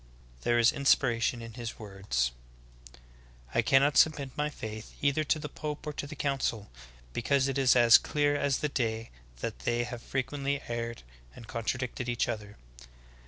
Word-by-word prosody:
There 120 Hz, -, +2 dB
is 120 Hz, 0 st, +5 dB
inspiration 120 Hz, -4 st, +2 dB
in 115 Hz, -1 st, -9 dB
his 120 Hz, 0 st, -6 dB
words: 95 Hz, -, -2 dB, 1.2 s
'T -, -, +4 dB
cannot 140 Hz, +2 st, +4 dB
submit 145 Hz, -4 st, +4 dB
my 150 Hz, 0 st, 0 dB
faith 110 Hz, -6 st, -8 dB
either 145 Hz, +2 st, +2 dB
to 155 Hz, -, +2 dB
the 150 Hz, -, -5 dB
pope 150 Hz, +1 st, -6 dB
or 150 Hz, -, -3 dB
to 145 Hz, -, -5 dB
the -, -, -8 dB
council, 135 Hz, -7 st, -1 dB, 0.4 s
because 135 Hz, +3 st, +2 dB
it 135 Hz, 0 st, -1 dB
is 130 Hz, -2 st, +5 dB
as 120 Hz, -2 st, +8 dB
clear 145 Hz, -1 st, +1 dB
as 140 Hz, -2 st, +1 dB
the 150 Hz, -, 0 dB
day 115 Hz, -4 st, -2 dB, 0.3 s
that -, -, -4 dB
they 120 Hz, 0 st, 0 dB
have 120 Hz, -1 st, -6 dB
frequently 140 Hz, +2 st, -2 dB
erred 115 Hz, -, -4 dB, 0.3 s
and 115 Hz, -, -11 dB
contra 115 Hz, +2 st, -2 dB
dicted 125 Hz, 0 st, -4 dB
each 120 Hz, 0 st, 0 dB
other. 105 Hz, -3 st, -5 dB
125 Hz, 165 wpm, -30 LUFS, 115-140 Hz, 1.2 s, as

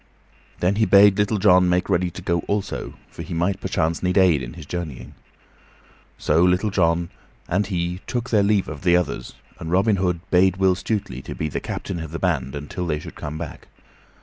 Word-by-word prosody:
Then 95 Hz, +3 st, +2 dB
he 110 Hz, -, +3 dB
bade 100 Hz, 0 st, +6 dB
Little 105 Hz, +1 st, +1 dB
John 90 Hz, -2 st, +5 dB
make 90 Hz, +1 st, +1 dB
ready 90 Hz, -2 st, +1 dB
to 90 Hz, +2 st, -10 dB
go 85 Hz, -2 st, +1 dB
also, 100 Hz, -1 st, -3 dB, 0.2 s
for -, -, -9 dB
he -, -, -6 dB
might 90 Hz, +3 st, 0 dB
perchance 80 Hz, +1 st, -1 dB
need 90 Hz, +1 st, 0 dB
aid 90 Hz, -7 st, +4 dB
in -, -, -7 dB
his 80 Hz, -4 st, -10 dB
journeying. 80 Hz, -5 st, -6 dB, 1.0 s
So 80 Hz, +2 st, +2 dB
Little 90 Hz, +4 st, +2 dB
John 85 Hz, -2 st, +1 dB, 0.4 s
and 95 Hz, +3 st, 0 dB
he 90 Hz, -1 st, -2 dB
took 125 Hz, -1 st, -3 dB
their 105 Hz, -3 st, +4 dB
leave 100 Hz, -1 st, +2 dB
of 75 Hz, -2 st, -7 dB
the 90 Hz, -1 st, +4 dB
others, 90 Hz, -, -3 dB, 0.2 s
and 80 Hz, -, -6 dB
Robin 100 Hz, +3 st, +3 dB
Hood 90 Hz, -2 st, 0 dB
bade 95 Hz, 0 st, +4 dB
Will 95 Hz, -1 st, +3 dB
Stutely 95 Hz, -, -3 dB
be 75 Hz, +3 st, -4 dB
the -, -, -3 dB
captain 90 Hz, -3 st, -5 dB
of 80 Hz, -1 st, -6 dB
the 85 Hz, -, -5 dB
band 70 Hz, -8 st, -1 dB
until 75 Hz, +5 st, -5 dB
they 75 Hz, -2 st, 0 dB
should 75 Hz, -, -9 dB
come 75 Hz, +1 st, -6 dB
back. 80 Hz, -2 st, -8 dB
90 Hz, 200 wpm, -22 LUFS, 85-95 Hz, 1.0 s, bade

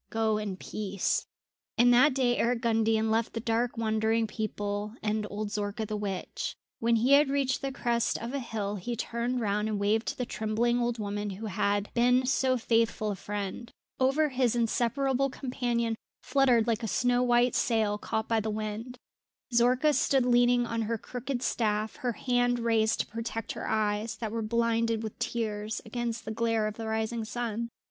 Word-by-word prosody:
Go 220 Hz, -1 st, +1 dB
in 200 Hz, -3 st, -4 dB
peace." 200 Hz, -1 st, -2 dB, 0.5 s
And 245 Hz, +1 st, +6 dB
that 255 Hz, +3 st, +5 dB
day 250 Hz, -2 st, +2 dB
Eric 235 Hz, 0 st, +1 dB
Gundian 225 Hz, -1 st, +2 dB
left 225 Hz, +1 st, +1 dB
the 230 Hz, -, -2 dB
dark 230 Hz, +2 st, 0 dB
wandering 220 Hz, 0 st, +1 dB
people 210 Hz, -1 st, -3 dB
and 215 Hz, 0 st, 0 dB
old 210 Hz, +1 st, -4 dB
Zorka 205 Hz, 0 st, -2 dB
the 215 Hz, -, -4 dB
witch. 200 Hz, -3 st, -4 dB, 0.2 s
When 230 Hz, 0 st, +3 dB
he 235 Hz, +4 st, +2 dB
had 285 Hz, 0 st, +6 dB
reached 275 Hz, -2 st, 0 dB
the 275 Hz, -, -2 dB
crest 235 Hz, -3 st, 0 dB
of 235 Hz, +3 st, -6 dB
a 280 Hz, -, -1 dB
hill 210 Hz, -4 st, -3 dB
he 235 Hz, +6 st, -4 dB
turned 240 Hz, +2 st, -2 dB
round 210 Hz, 0 st, 0 dB
and 210 Hz, -2 st, -1 dB
waved 215 Hz, +3 st, +1 dB
to -, -, -2 dB
the 250 Hz, -, -1 dB
trembling 230 Hz, +2 st, 0 dB
old 240 Hz, 0 st, 0 dB
woman 205 Hz, -1 st, -3 dB
who 200 Hz, +3 st, -6 dB
had 205 Hz, 0 st, 0 dB
been 250 Hz, +2 st, +3 dB
so 260 Hz, 0 st, +2 dB
faithful 225 Hz, -2 st, +1 dB
a -, -, -3 dB
friend. 205 Hz, +4 st, -5 dB, 0.3 s
Over 275 Hz, +4 st, +3 dB
his 255 Hz, -, -12 dB
head -, -, 0 dB
his 240 Hz, -2 st, +3 dB
inseparable 260 Hz, +3 st, +1 dB
companion 240 Hz, -4 st, -1 dB, 0.3 s
fluttered 255 Hz, -4 st, +3 dB
like 230 Hz, -1 st, 0 dB
a 225 Hz, -, -2 dB
snow 245 Hz, +3 st, +2 dB
white 245 Hz, 0 st, +3 dB
sail 215 Hz, -3 st, +1 dB
caught 220 Hz, +1 st, -2 dB
by 225 Hz, -1 st, +2 dB
the 220 Hz, 0 st, -2 dB
wind. 215 Hz, +3 st, -4 dB, 0.6 s
Zorka 250 Hz, +5 st, +4 dB
stood 265 Hz, -1 st, +2 dB
leaning 245 Hz, 0 st, +4 dB
on 230 Hz, 0 st, -2 dB
her 225 Hz, +1 st, -1 dB
crooked 250 Hz, +3 st, -4 dB
staff, 215 Hz, -1 st, 0 dB
her 250 Hz, -5 st, -1 dB
hand 245 Hz, 0 st, +1 dB
raised 225 Hz, -2 st, +2 dB
to -, -, -4 dB
protect 225 Hz, 0 st, -5 dB
her -, -, -5 dB
eyes, 215 Hz, 0 st, 0 dB
that 220 Hz, -3 st, -4 dB
were 230 Hz, 0 st, -2 dB
blinded 230 Hz, 0 st, +1 dB
with 220 Hz, -, -6 dB
tears, 215 Hz, -2 st, -2 dB
against 235 Hz, 0 st, -3 dB
the 220 Hz, -, -4 dB
glare 225 Hz, -1 st, +1 dB
of 215 Hz, 0 st, -4 dB
the 225 Hz, -1 st, -5 dB
rising 220 Hz, +1 st, -1 dB
sun. 235 Hz, 0 st, -3 dB
230 Hz, 185 wpm, -29 LUFS, 215-245 Hz, 0.6 s, And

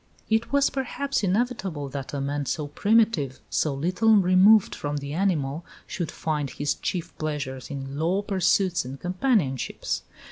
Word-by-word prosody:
It 220 Hz, +1 st, +1 dB
was, 280 Hz, 0 st, +3 dB
perhaps, 275 Hz, 0 st, -2 dB
inevitable 195 Hz, -, -1 dB
that 135 Hz, 0 st, -6 dB
a 145 Hz, -, -3 dB
man 140 Hz, 0 st, -2 dB
so 150 Hz, -, -1 dB
primitive, 195 Hz, -, +2 dB
so 150 Hz, -3 st, +1 dB
little 185 Hz, +10 st, +3 dB
removed 190 Hz, +2 st, +5 dB
from 145 Hz, 0 st, -3 dB
the 140 Hz, 0 st, -5 dB
animal, 160 Hz, -4 st, 0 dB, 0.2 s
should 175 Hz, -6 st, -4 dB
find 150 Hz, -3 st, -2 dB
his 145 Hz, +3 st, -1 dB
chief 175 Hz, -3 st, -4 dB
pleasures 145 Hz, -4 st, -4 dB
in 140 Hz, 0 st, -5 dB
low 180 Hz, +5 st, +1 dB
pursuits 185 Hz, -1 st, +2 dB
and 130 Hz, +2 st, -8 dB
companionships. 180 Hz, -, 0 dB
170 Hz, 145 wpm, -25 LUFS, 140-200 Hz, 0.2 s, removed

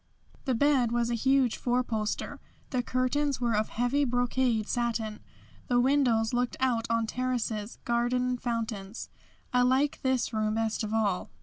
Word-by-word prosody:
The 260 Hz, -3 st, +1 dB
bed 265 Hz, -2 st, +3 dB
was 235 Hz, 0 st, +1 dB
a -, -, +1 dB
huge 265 Hz, +1 st, +2 dB
four 250 Hz, 0 st, +1 dB
poster. 215 Hz, -3 st, -3 dB, 0.3 s
The 255 Hz, -2 st, +1 dB
curtains 255 Hz, +3 st, 0 dB
were 235 Hz, -3 st, +1 dB
of 215 Hz, +1 st, 0 dB
heavy 245 Hz, +5 st, +1 dB
brocaded 245 Hz, -3 st, +1 dB
satin. 230 Hz, -3 st, -2 dB, 0.5 s
The 245 Hz, -1 st, +3 dB
windows 245 Hz, -4 st, +2 dB
looked 245 Hz, 0 st, 0 dB
out 245 Hz, -3 st, +1 dB
on 230 Hz, 0 st, +1 dB
terraces, 235 Hz, -3 st, -2 dB
garden 240 Hz, +1 st, +1 dB
and 250 Hz, -1 st, -2 dB
fountains. 225 Hz, -3 st, -4 dB, 0.4 s
I 250 Hz, -, +4 dB
like 260 Hz, +3 st, +2 dB
this 260 Hz, -3 st, 0 dB
room 215 Hz, 0 st, 0 dB
best 225 Hz, 0 st, -1 dB
of 215 Hz, -, -3 dB
all. 210 Hz, -4 st, 0 dB
240 Hz, 155 wpm, -29 LUFS, 225-255 Hz, 0.5 s, I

